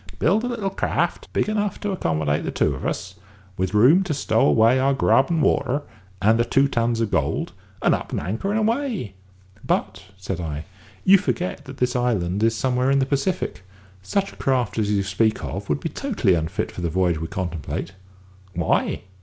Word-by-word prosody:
"Build 200 Hz, +8 st, +2 dB
a -, -, -1 dB
little 225 Hz, -6 st, -2 dB
craft -, -, -1 dB
big -, -, 0 dB
enough 210 Hz, -2 st, -1 dB
to 205 Hz, -, -1 dB
accommodate 80 Hz, -, 0 dB
the -, -, -2 dB
two 75 Hz, -, +1 dB
of 65 Hz, -, -4 dB
us; 95 Hz, +2 st, -4 dB, 0.4 s
with 95 Hz, +2 st, -2 dB
room 130 Hz, -, +6 dB
to 155 Hz, -6 st, -1 dB
stow 110 Hz, -5 st, +2 dB
away 115 Hz, -, +4 dB
our 135 Hz, +1 st, +2 dB
grub 135 Hz, 0 st, +3 dB
and 165 Hz, -3 st, +1 dB
water, 140 Hz, +1 st, +1 dB, 0.4 s
and 110 Hz, +5 st, +3 dB
the -, -, +4 dB
two 135 Hz, +4 st, +3 dB
tons 115 Hz, -3 st, 0 dB
of 110 Hz, -, -1 dB
gold; -, -, -1 dB, 0.3 s
and -, -, +4 dB
up -, -, -3 dB
anchor 110 Hz, -, -2 dB
and 210 Hz, -, +1 dB
away." 225 Hz, -, -1 dB, 0.5 s
"But," 95 Hz, 0 st, -1 dB
said 95 Hz, -1 st, -4 dB
I, 75 Hz, -2 st, -4 dB, 0.4 s
"you 195 Hz, +1 st, +7 dB
forget 180 Hz, -1 st, -3 dB
that 135 Hz, +1 st, -9 dB
this 125 Hz, 0 st, 0 dB
island 105 Hz, -6 st, 0 dB
is 115 Hz, 0 st, +2 dB
somewhere 130 Hz, +1 st, +1 dB
in 140 Hz, -, +4 dB
the 135 Hz, -, +2 dB
Pacific. 140 Hz, -, -1 dB, 0.4 s
Such 195 Hz, -, -1 dB
a -, -, -17 dB
craft 125 Hz, -6 st, 0 dB
as 105 Hz, -2 st, 0 dB
you 100 Hz, -1 st, +1 dB
speak 110 Hz, +3 st, 0 dB
of 100 Hz, +1 st, -5 dB
would -, -, +1 dB
be 165 Hz, -, -3 dB
totally 195 Hz, -, 0 dB
unfit 80 Hz, -1 st, -1 dB
for -, -, -7 dB
the 85 Hz, -, -1 dB
voyage 85 Hz, -1 st, +1 dB
we 80 Hz, -, -4 dB
contemplate." 85 Hz, -4 st, -4 dB, 0.6 s
"Why?" 85 Hz, -2 st, 0 dB
120 Hz, 195 wpm, -23 LUFS, 95-155 Hz, 0.6 s, you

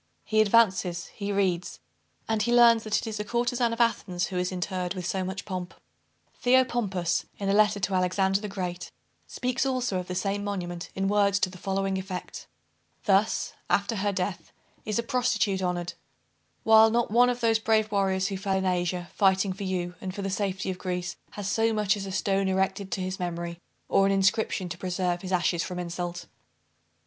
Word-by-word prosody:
He 215 Hz, 0 st, +3 dB
advances, 190 Hz, -5 st, +3 dB
he 205 Hz, -1 st, -4 dB
reads, 185 Hz, -3 st, 0 dB, 0.5 s
and 220 Hz, -1 st, 0 dB
he 235 Hz, -, +1 dB
learns 235 Hz, -2 st, +6 dB
that 215 Hz, -1 st, 0 dB
it -, -, -3 dB
is 220 Hz, -2 st, -4 dB
a -, -, -1 dB
courtezan 240 Hz, +2 st, 0 dB
of 230 Hz, -, -4 dB
Athens 200 Hz, -6 st, +1 dB
who 185 Hz, -, -4 dB
is 180 Hz, +1 st, -1 dB
interred 180 Hz, 0 st, -3 dB
with 180 Hz, -1 st, -5 dB
so 190 Hz, +1 st, -1 dB
much 190 Hz, +1 st, -5 dB
pomp." 185 Hz, -2 st, -5 dB, 0.7 s
Theopompus, 235 Hz, -9 st, +2 dB
in 200 Hz, -1 st, -2 dB
a -, -, +3 dB
letter 210 Hz, 0 st, +4 dB
to 190 Hz, 0 st, -1 dB
Alexander 190 Hz, +2 st, +2 dB
the 210 Hz, -, -4 dB
Great, 180 Hz, -3 st, -5 dB, 0.4 s
speaks 250 Hz, +1 st, -1 dB
also 255 Hz, -8 st, 0 dB
of 180 Hz, -, -6 dB
the 180 Hz, -, -4 dB
same 200 Hz, +2 st, -1 dB
monument 175 Hz, -4 st, -4 dB
in 195 Hz, 0 st, 0 dB
words 200 Hz, -1 st, +3 dB
to 185 Hz, -, +1 dB
the 185 Hz, -, -11 dB
following 195 Hz, 0 st, -1 dB
effect 185 Hz, -1 st, -7 dB, 0.6 s
"Thus, 205 Hz, +2 st, +2 dB, 0.2 s
after 200 Hz, +4 st, +1 dB
her 205 Hz, +1 st, 0 dB
death, 185 Hz, -1 st, -3 dB, 0.3 s
is 215 Hz, -1 st, -1 dB
a 235 Hz, -, 0 dB
prostitute 230 Hz, -5 st, +1 dB
honored; 175 Hz, -1 st, -2 dB, 0.7 s
while 220 Hz, 0 st, +7 dB
not 235 Hz, -1 st, 0 dB
one 245 Hz, +2 st, +5 dB
of 245 Hz, 0 st, -1 dB
those 225 Hz, -2 st, +3 dB
brave 220 Hz, -1 st, +2 dB
warriors 195 Hz, -1 st, +1 dB
who 195 Hz, -, -3 dB
fell 195 Hz, 0 st, -1 dB
in 190 Hz, -, -1 dB
Asia, 180 Hz, -1 st, -1 dB
fighting 190 Hz, -1 st, +3 dB
for 195 Hz, +1 st, -6 dB
you, 180 Hz, -2 st, -2 dB
and 185 Hz, -1 st, -5 dB
for 200 Hz, -, -4 dB
the 195 Hz, -, -2 dB
safety 190 Hz, -1 st, -2 dB
of 180 Hz, -, -7 dB
Greece, 180 Hz, -1 st, -3 dB, 0.2 s
has 205 Hz, -2 st, -5 dB
so 225 Hz, +2 st, +2 dB
much 210 Hz, -2 st, +2 dB
as 195 Hz, -1 st, -5 dB
a -, -, -5 dB
stone 195 Hz, 0 st, +1 dB
erected 190 Hz, +1 st, 0 dB
to 190 Hz, -, -2 dB
his 185 Hz, +1 st, -3 dB
memory, 170 Hz, -1 st, -4 dB, 0.3 s
or 195 Hz, -, +4 dB
an -, -, +2 dB
inscription 195 Hz, 0 st, +1 dB
to 175 Hz, 0 st, -7 dB
preserve 180 Hz, -1 st, -1 dB
his 185 Hz, -, -6 dB
ashes 175 Hz, -1 st, +1 dB
from 180 Hz, -, -5 dB
insult." 175 Hz, 0 st, -4 dB
195 Hz, 195 wpm, -27 LUFS, 180-215 Hz, 0.7 s, while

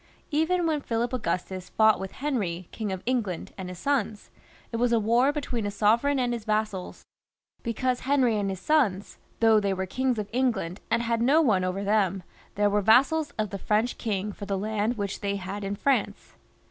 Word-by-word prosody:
Even 330 Hz, +4 st, +1 dB
when 310 Hz, -3 st, 0 dB
Philip 235 Hz, 0 st, -2 dB
Augustus 185 Hz, -4 st, -3 dB
fought 220 Hz, 0 st, +4 dB
with 195 Hz, 0 st, -6 dB
Henry, 190 Hz, -12 st, -2 dB
King 215 Hz, -3 st, -4 dB
of 190 Hz, -1 st, -5 dB
England, 230 Hz, -9 st, -2 dB
and 185 Hz, -2 st, -6 dB
his 180 Hz, -, -8 dB
sons, 220 Hz, -3 st, -1 dB, 0.4 s
it 230 Hz, -, -2 dB
was 240 Hz, +1 st, +2 dB
a 230 Hz, -, +4 dB
war 235 Hz, +6 st, +3 dB
be 295 Hz, 0 st, -3 dB
tween 235 Hz, -6 st, -3 dB
a -, -, -1 dB
sovereign 230 Hz, +8 st, +2 dB
and 245 Hz, -2 st, 0 dB
his 235 Hz, -2 st, -4 dB
vassals, 215 Hz, -3 st, -2 dB, 0.6 s
because 250 Hz, +2 st, -1 dB
Henry 260 Hz, -4 st, +2 dB
and 200 Hz, -1 st, -1 dB
his 190 Hz, -2 st, -4 dB
sons, 210 Hz, -7 st, +1 dB, 0.2 s
though 225 Hz, -1 st, +6 dB
they 200 Hz, -2 st, 0 dB
were 190 Hz, 0 st, -2 dB
kings 255 Hz, +5 st, -1 dB
of 210 Hz, -2 st, -3 dB
England 225 Hz, -8 st, 0 dB
and 235 Hz, +1 st, +1 dB
had 230 Hz, -1 st, 0 dB
no 275 Hz, +7 st, +4 dB
one 215 Hz, -, +3 dB
over 185 Hz, +2 st, -2 dB
them 195 Hz, -3 st, +1 dB, 0.3 s
there, 205 Hz, 0 st, +3 dB
were 205 Hz, 0 st, +2 dB
vassals 275 Hz, -, +4 dB
of 215 Hz, -2 st, -2 dB
the 200 Hz, -, -5 dB
French 215 Hz, +5 st, 0 dB
king 210 Hz, -2 st, -2 dB
for 200 Hz, 0 st, -8 dB
the 200 Hz, -1 st, -1 dB
land 215 Hz, +3 st, -1 dB
which 200 Hz, -1 st, -3 dB
they 200 Hz, -1 st, -1 dB
had 200 Hz, +1 st, -5 dB
in 195 Hz, +1 st, -2 dB
France. 270 Hz, +6 st, -1 dB
220 Hz, 200 wpm, -27 LUFS, 195-250 Hz, 0.6 s, though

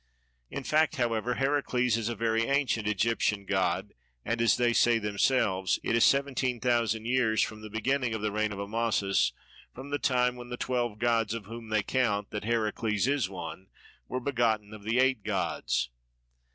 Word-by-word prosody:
In 140 Hz, -, -5 dB
fact 155 Hz, +4 st, +2 dB
however 120 Hz, -2 st, 0 dB
Heracles 135 Hz, -4 st, +1 dB
is 115 Hz, -1 st, -1 dB
a 120 Hz, -, -3 dB
very 115 Hz, +1 st, +1 dB
ancient 130 Hz, -6 st, +1 dB
Egyptian 105 Hz, -1 st, 0 dB
god; 95 Hz, 0 st, 0 dB, 0.3 s
and 115 Hz, 0 st, -1 dB
(as 115 Hz, -, +4 dB
they 120 Hz, -1 st, +2 dB
say 120 Hz, 0 st, +4 dB
themselves) 100 Hz, -3 st, +1 dB
it -, -, +1 dB
is 115 Hz, -, +4 dB
seventeen 135 Hz, -3 st, +2 dB
thousand 115 Hz, -3 st, +1 dB
years 120 Hz, -3 st, +2 dB
to 110 Hz, 0 st, -5 dB
the 110 Hz, -, -8 dB
beginning 120 Hz, +2 st, 0 dB
of 110 Hz, -, -4 dB
the 105 Hz, -, 0 dB
reign 110 Hz, 0 st, 0 dB
of 100 Hz, -, -6 dB
Amasis 100 Hz, -, +1 dB, 0.4 s
from 135 Hz, +3 st, -9 dB
the 145 Hz, -, -1 dB
time 125 Hz, -1 st, +1 dB
when 120 Hz, 0 st, -9 dB
the 125 Hz, -, -5 dB
twelve 120 Hz, -4 st, -1 dB
gods, 115 Hz, -2 st, +1 dB
of 110 Hz, -3 st, -6 dB
whom 115 Hz, +1 st, -9 dB
they 110 Hz, -1 st, +1 dB
count 105 Hz, -5 st, 0 dB
that 105 Hz, -1 st, -4 dB
Heracles 110 Hz, -1 st, 0 dB
is 135 Hz, -7 st, +1 dB
one, 90 Hz, 0 st, -7 dB, 0.4 s
were 130 Hz, -, -3 dB
begotten 115 Hz, -5 st, 0 dB
of 105 Hz, -, -10 dB
the 110 Hz, +4 st, -1 dB
eight 130 Hz, -3 st, +3 dB
gods. -, -, -1 dB
115 Hz, 180 wpm, -29 LUFS, 105-125 Hz, 0.4 s, as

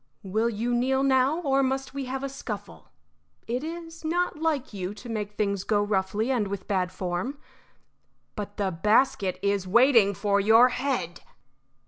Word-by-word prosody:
Will 215 Hz, +4 st, 0 dB
you 235 Hz, +2 st, -2 dB
kneel 265 Hz, +3 st, +1 dB
now, 270 Hz, +4 st, +3 dB
or 275 Hz, -4 st, +2 dB
must 265 Hz, 0 st, -1 dB
we 275 Hz, -1 st, -4 dB
have 265 Hz, +1 st, -4 dB
a -, -, -1 dB
scuffle? 210 Hz, -, -8 dB, 0.6 s
It 245 Hz, +4 st, -2 dB
is 330 Hz, 0 st, -7 dB
not 340 Hz, 0 st, -1 dB
like 300 Hz, -7 st, -1 dB
you 190 Hz, 0 st, -4 dB
to 240 Hz, +3 st, -10 dB
make 210 Hz, -2 st, -3 dB
things 200 Hz, -2 st, -1 dB
go 205 Hz, 0 st, +1 dB
roughly 205 Hz, +4 st, 0 dB
and 230 Hz, -6 st, +1 dB
with 195 Hz, -1 st, -6 dB
bad 185 Hz, -2 st, 0 dB
form. 185 Hz, +10 st, -3 dB, 1.0 s
But 205 Hz, -1 st, -6 dB
the 200 Hz, -2 st, 0 dB
basket 205 Hz, +1 st, +2 dB
is 200 Hz, -2 st, 0 dB
waiting 230 Hz, -1 st, +5 dB
for 200 Hz, +1 st, +1 dB
your 225 Hz, +5 st, +6 dB
head." 250 Hz, -10 st, -2 dB
225 Hz, 160 wpm, -26 LUFS, 200-270 Hz, 1.0 s, your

